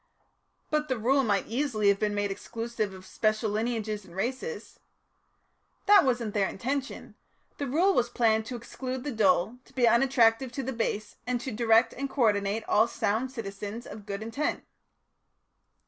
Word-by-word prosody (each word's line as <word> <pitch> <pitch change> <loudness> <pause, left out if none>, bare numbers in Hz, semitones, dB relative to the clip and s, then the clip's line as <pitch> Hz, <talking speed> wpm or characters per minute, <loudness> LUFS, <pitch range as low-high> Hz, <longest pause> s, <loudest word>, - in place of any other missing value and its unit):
"But 305 0 +1
the 260 -3 -1
Rule 265 +5 +3
might 200 -4 +1
easily 230 -4 +1
have 200 0 +3
been 210 -1 0
made 205 -1 0
exclusive 225 0 -4
of 190 0 -11
special 215 +1 0
lineages 215 -1 -2
and 175 -2 -15
races." 260 - -4 1.1
"That 410 0 +7
wasn't 240 -5 0
their 200 -2 +2
intention. 270 +6 -4 0.5
The 285 - -2
Rule 345 +9 +3
was 245 -6 +2
planned 220 -2 +2
to 250 - -5
exclude 255 +2 -5
the 290 - -3
dull, 210 0 +2
to - - -22
be 250 -2 +3
unattractive 235 0 +4
to 270 - -3
the 265 +1 -3
base, 215 -2 -3
and 250 -1 0
to 260 - -4
direct 225 +1 +3
and 275 +1 -4
co 270 -1 0
ordinate 205 0 +1
all 220 +2 +4
sound 225 +3 -1
citizens 210 -1 -6
of 205 0 -10
good 200 +1 -4
intent." 230 +7 -2
230 Hz, 165 wpm, -28 LUFS, 210-260 Hz, 1.1 s, That